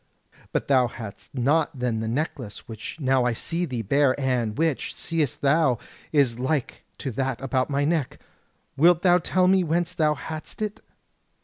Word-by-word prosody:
But - - -1
thou 130 -3 +4
hadst 115 +1 -10
not 145 +3 +1
then 125 -3 -1
the 110 - -2
necklace, 125 -3 -4
which 110 +7 -8
now 130 -3 +2
I 125 -1 +1
see 170 +9 -2
thee 125 -7 -4
bear, 140 +5 +2
and 125 -5 0
which, 160 -3 0
seest 160 -6 -2
thou! 140 -3 +3 0.3
is 135 -6 +2
like 130 +1 -2
to 135 - -4
that 130 0 -2
about 130 -1 0
my 140 0 +1
neck. 155 -4 -1 0.6
Wilt 165 +4 +5
thou 180 -1 +5
tell 180 +2 +2
me 190 0 +4
whence 170 +2 0
thou 155 -3 +2
hadst 155 +1 -7
it?" 210 -1 -3
140 Hz, 170 wpm, -25 LUFS, 125-160 Hz, 0.6 s, Wilt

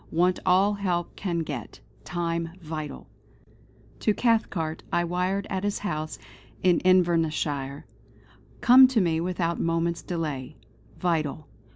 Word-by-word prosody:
Want 180 +2 +2
all 190 +3 +4
help 180 -4 -2
can 170 -4 -2
get. 135 -8 -6 0.2
Time 170 0 -2
vital...." 155 -4 -6 0.9
To 215 - +1
Cathcart 190 -9 0
I 175 - +2
wired 180 +3 -1
at 190 -1 -2
his 205 0 0
house 155 -6 -4 0.5
in 180 -2 +4
Invernesshire: 160 -6 +1 0.8
"Come 260 +2 +9
to 255 -3 +1
me 165 -4 +1
without 170 -1 -1
moment's 165 0 0
delay. 150 -5 -4 0.4
Vital. 155 -4 -1
170 Hz, 115 wpm, -26 LUFS, 160-185 Hz, 0.9 s, Come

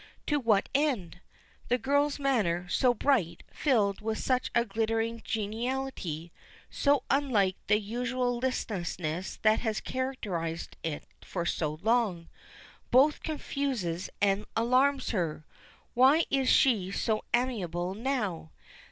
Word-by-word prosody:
To 295 -1 +1
what 220 -6 +2
end? 255 - 0 0.5
The 245 - +2
girl's 285 +4 +1
manner, 210 -11 0
so 250 +7 +3
bright, 220 - +1
filled 215 -9 +1
with 220 0 -2
such 255 -1 0
a 235 0 +4
glittering 225 +1 -1
geniality 220 - -3 0.4
so 285 -1 +2
unlike 230 -10 +2
the 210 - +4
usual 245 +3 -2
listlessness 180 -8 -3
that 215 0 +4
has 220 -3 -1
characterized 195 -11 -4
it 155 -3 -4 0.2
for 175 -2 -4
so 155 -3 -1
long 220 -7 +1 0.6
both 280 +4 +4
confuses 265 - -3
and 200 +1 +2
alarms 255 +4 +2
her. 165 -7 -2 0.5
Why 270 +7 +5
is 270 -2 +2
she 215 -9 +4
so 215 +2 -1
amiable 190 -8 -1
now? 215 -8 -2
225 Hz, 115 wpm, -29 LUFS, 185-260 Hz, 0.6 s, Why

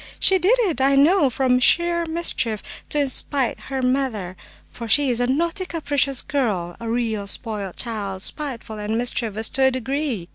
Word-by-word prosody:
She 380 -1 +6
did 400 +8 +3
it, 340 - 0
I 275 +1 +3
know, 295 +2 +4
from 250 0 +1
sheer 340 +5 +3
mischief, 320 -10 -2 0.3
to 290 -2 +1
spite 265 -1 +3
her 265 -1 -3
mother, 250 -8 -1 0.3
for 235 - -9
she 280 +3 +3
is 240 0 0
a 245 - +1
naughty, 335 +7 -1
capricious 285 -5 0
girl, 200 -11 -2
a 230 - -5
real 225 -4 -2
spoiled 205 -3 -5
child 200 -5 -4
spiteful 235 -7 -6
and 210 +2 -2
mischievous 225 -3 -1
to 270 - -1
a - - +5
degree! 260 - -3
255 Hz, 170 wpm, -22 LUFS, 220-290 Hz, 0.3 s, She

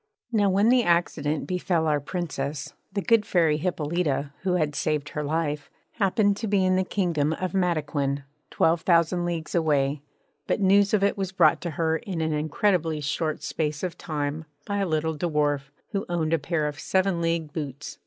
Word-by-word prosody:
Now 205 -3 +3
when 200 +4 +3
the 250 0 +5
accident 165 -5 +1
befell 180 -3 0
our 150 -2 +2
Princess 145 -2 -4 0.2
the 200 0 -2
good 230 -2 +4
Fairy 165 -6 +2
Hippolyta, 150 -3 -1
who 190 -1 0
had 155 -4 +1
saved 150 0 -1
her 150 - -3
life, 150 -1 -2 0.2
happened 205 -1 +2
to 225 - -3
be 195 -2 +2
in 185 0 +3
the 185 - +2
Kingdom 170 -6 0
of 185 +2 -3
Mataquin, 150 -6 0 0.3
twelve 165 +1 +2
thousand 175 0 +2
leagues 170 -2 -3
away; 145 -4 +1 0.5
but - - +1
news 200 +1 +4
of 200 - +1
it 200 0 +1
was 190 -1 -2
brought 190 - +4
to 175 - -3
her 160 +1 0
in 180 0 -5
an 160 -1 0
incredibly 160 +1 +1
short 150 +1 -2
space 150 -1 -2
of 180 -2 -2
time 155 -1 -3 0.2
by 205 - -2
a 200 -1 0
little 160 0 0
dwarf 150 -3 0 0.2
who 200 -2 -2
owned 165 -2 0
a 165 - +3
pair 155 +1 -1
of 150 +1 -5
seven 185 -2 +1
league 165 -2 -1
boots. 145 -3 -6
165 Hz, 185 wpm, -26 LUFS, 150-185 Hz, 0.5 s, the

